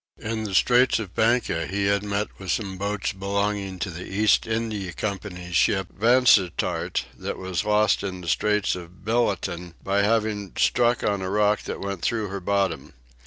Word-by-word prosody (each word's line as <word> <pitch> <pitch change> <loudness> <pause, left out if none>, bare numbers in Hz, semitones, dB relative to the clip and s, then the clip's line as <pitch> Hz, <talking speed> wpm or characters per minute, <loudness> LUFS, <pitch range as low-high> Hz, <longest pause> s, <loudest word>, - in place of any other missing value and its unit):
In 110 0 -4
the 100 -3 -3
Straits 125 +5 +4
of 105 -5 -6
Banca 110 -8 +1
he 100 +4 -1
had 100 0 +2
met 105 0 -3
with 95 -1 -8
some 95 -1 -1
boats 100 0 -2
belonging 100 0 -2
to 95 +1 -3
the 85 +2 -7
East 105 +3 +3
India 110 -4 -2
Company's 90 -2 -5
ship 95 +1 +2
Vansittart 115 -5 +3
that - - -5
was 95 -1 -2
lost 105 -1 +3
in 95 -2 -5
the 85 - -9
straits 105 +4 +1
of 90 +1 -11
Billaton 95 -7 -1
by 100 +1 +1
having 105 -2 0
struck 120 -1 +2
on 100 -2 0
a 95 - -3
rock 105 +1 +2
that - - -5
went 100 -2 -4
through 110 -1 -1
her 100 +1 -4
bottom. 95 -6 -1
100 Hz, 170 wpm, -24 LUFS, 95-105 Hz, -, Straits